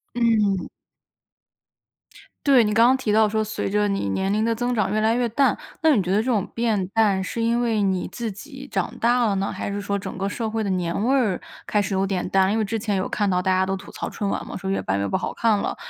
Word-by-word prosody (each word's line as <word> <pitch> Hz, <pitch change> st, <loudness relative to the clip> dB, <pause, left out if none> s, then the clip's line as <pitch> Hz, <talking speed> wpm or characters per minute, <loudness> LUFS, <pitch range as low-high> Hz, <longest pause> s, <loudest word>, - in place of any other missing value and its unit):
嗯。 215 Hz, -5 st, +2 dB, 1.8 s
对， 265 Hz, -4 st, +6 dB
你 210 Hz, 0 st, 0 dB
刚 230 Hz, +2 st, +6 dB
刚 260 Hz, -, +4 dB
提 235 Hz, -5 st, -1 dB
到 215 Hz, 0 st, +4 dB
说 215 Hz, +1 st, 0 dB
随 215 Hz, -2 st, -3 dB
着 210 Hz, +1 st, +2 dB
你 195 Hz, -, -1 dB
年 190 Hz, -, -1 dB
龄 215 Hz, +1 st, +1 dB
的 230 Hz, -, +1 dB
增 245 Hz, +2 st, -1 dB
长 210 Hz, -3 st, 0 dB
越 215 Hz, -, +1 dB
来 220 Hz, +1 st, +2 dB
越 245 Hz, 0 st, +1 dB
淡， 270 Hz, +5 st, +2 dB, 0.2 s
那 315 Hz, -2 st, +4 dB
你 210 Hz, -, +2 dB
觉 180 Hz, -, -4 dB
得 195 Hz, -, +3 dB
这 215 Hz, -, +1 dB
种 230 Hz, -7 st, +1 dB
变 220 Hz, -5 st, 0 dB
淡 200 Hz, -2 st, +2 dB
是 210 Hz, +5 st, -4 dB
因 230 Hz, +1 st, +1 dB
为 230 Hz, -3 st, +1 dB
你 190 Hz, -2 st, 0 dB
自 230 Hz, -3 st, -4 dB
己 270 Hz, +6 st, -10 dB
长 190 Hz, -7 st, -2 dB
大 240 Hz, +1 st, +3 dB
了 200 Hz, -2 st, +1 dB
呢， 195 Hz, +1 st, -1 dB
还 -, -, -4 dB
是 200 Hz, 0 st, -3 dB
说 200 Hz, 0 st, -2 dB
整 190 Hz, -, -6 dB
个 195 Hz, +1 st, -1 dB
社 220 Hz, +2 st, -3 dB
会 220 Hz, 0 st, -2 dB
的 -, -, -2 dB
年 180 Hz, +1 st, -1 dB
味 260 Hz, +3 st, +3 dB
儿 225 Hz, -9 st, +1 dB, 0.3 s
开 210 Hz, -, +2 dB
始 200 Hz, -1 st, -2 dB
有 190 Hz, 0 st, +1 dB
点 190 Hz, -2 st, -2 dB
淡？ 190 Hz, 0 st, +3 dB
因 215 Hz, -, +1 dB
为 220 Hz, -, +1 dB
之 225 Hz, +2 st, -2 dB
前 205 Hz, -2 st, -1 dB
有 190 Hz, -, -1 dB
看 205 Hz, -2 st, 0 dB
到 180 Hz, -1 st, +1 dB
大 185 Hz, +1 st, +1 dB
家 185 Hz, 0 st, +3 dB
都 190 Hz, +1 st, -2 dB
吐 190 Hz, -, -11 dB
槽 -, -, -5 dB
春 205 Hz, -, -3 dB
晚 -, -, -2 dB
嘛， -, -, -7 dB
说 190 Hz, -, -5 dB
越 195 Hz, -, -1 dB
办 95 Hz, -, -1 dB
越 100 Hz, -, -1 dB
不 -, -, 0 dB
好 190 Hz, -, -3 dB
看 225 Hz, -2 st, +2 dB
了， 200 Hz, -, -2 dB
210 Hz, 290 characters per minute, -23 LUFS, 195-230 Hz, 1.8 s, 对